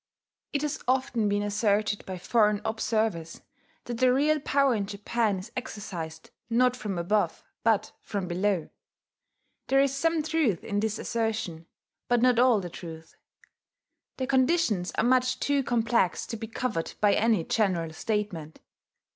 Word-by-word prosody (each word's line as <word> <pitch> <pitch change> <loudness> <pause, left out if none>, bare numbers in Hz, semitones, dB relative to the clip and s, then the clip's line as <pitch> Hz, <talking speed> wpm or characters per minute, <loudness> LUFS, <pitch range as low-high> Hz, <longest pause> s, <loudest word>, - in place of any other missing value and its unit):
It 285 0 -1
has 300 +1 -2
often 250 -4 +1
been 205 0 +1
asserted 205 0 +1
by 190 -1 -4
foreign 210 +2 +2
observers 220 -7 -1 0.4
that 240 -1 -5
the 255 -1 +5
real 300 +4 +3
power 275 -1 +2
in 205 -3 -1
Japan 210 +1 -1
is 190 +6 -8
exercised 170 -9 -6 0.2
not 250 +2 +3
from 210 -6 -4
above, 175 0 0 0.2
but 220 -1 +2
from 200 -3 -4
below. 185 -1 0 1.0
There 270 - +4
is 275 -1 +3
some 325 +3 +1
truth 305 - +1
in 205 -1 -1
this 220 0 -1
assertion, 220 -8 -2 0.4
but 245 0 +3
not 250 0 +4
all 245 -3 +5
the 180 - -5
truth: 165 -2 -10 1.0
the 260 - -1
conditions 260 - +2
are - - +1
much 255 +1 +2
too 285 -1 +1
complex 230 -6 +1
to - - -5
be 225 0 -6
covered 225 -7 -3
by 205 -1 +4
any 220 -5 +2
general 175 -6 0
statement. 180 -5 -3
220 Hz, 145 wpm, -27 LUFS, 195-255 Hz, 1.0 s, the